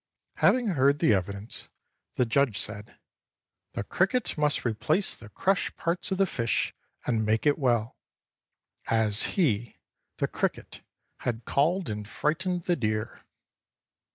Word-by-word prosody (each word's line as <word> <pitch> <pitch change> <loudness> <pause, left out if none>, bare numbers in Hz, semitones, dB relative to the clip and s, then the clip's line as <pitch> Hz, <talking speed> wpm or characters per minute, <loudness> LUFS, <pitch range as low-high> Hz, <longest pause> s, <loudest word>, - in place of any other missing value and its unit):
Having 245 -3 +4
heard 140 -4 +3
the - - +2
e\'idence, 100 +2 -2 0.5
the 125 - +2
judge 120 -2 +2
said, 105 0 -4 0.4
" - - -58
The - - -2
cricket 195 - 0
must 150 -3 0
replace 150 - 0
the 115 - -13
crushed 190 - 0
parts 170 +2 -1
of 190 - +1
the 195 - +4
fish 120 -10 0 0.3
and 115 -2 +1
make 110 +4 +1
it 145 +1 +3
well," 120 -3 +1 0.9
as 110 - +2
he, 120 - +1 0.4
the - - +1
cricket, - - -3 0.4
had 115 -2 -3
called 170 +6 +1
and 105 -1 -4
fright 150 +8 0
ened 180 -1 -2
the 175 - +2
deer. 110 -3 -2
125 Hz, 140 wpm, -28 LUFS, 110-170 Hz, 0.9 s, Having